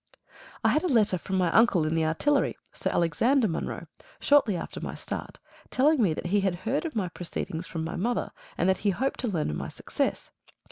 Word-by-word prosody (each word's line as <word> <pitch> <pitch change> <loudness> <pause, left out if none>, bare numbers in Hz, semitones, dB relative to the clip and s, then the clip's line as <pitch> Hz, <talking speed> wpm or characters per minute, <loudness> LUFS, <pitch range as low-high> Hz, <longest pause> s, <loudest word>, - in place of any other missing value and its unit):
I - - +5
had 305 - +3
a 365 - 0
letter 215 - +3
from 190 - -4
my 180 -2 +2
uncle 205 -7 +4
in 155 - 0
the 165 -1 +2
Artillery, 280 - +1 0.2
Sir - - -2
Alexander 225 - +2
Munro, 165 - -3 0.3
shortly 260 -10 +4
after - - -6
my - - -5
start, - - -6 0.3
telling 285 +2 +3
me 195 -7 +3
that - - -6
he 205 - +5
had 190 -2 +1
heard 270 +9 0
of 320 - -4
my 200 -5 0
proceedings 170 -1 -5
from 165 -1 -4
my 160 - -4
mother, 235 +7 -1 0.3
and 180 - +2
that 190 - +3
he 205 - +1
hoped 260 +8 -1
to 250 - -1
learn 170 - -1
of 75 - -3
my - - -4
success. - - -3
195 Hz, 215 wpm, -27 LUFS, 170-250 Hz, 0.3 s, I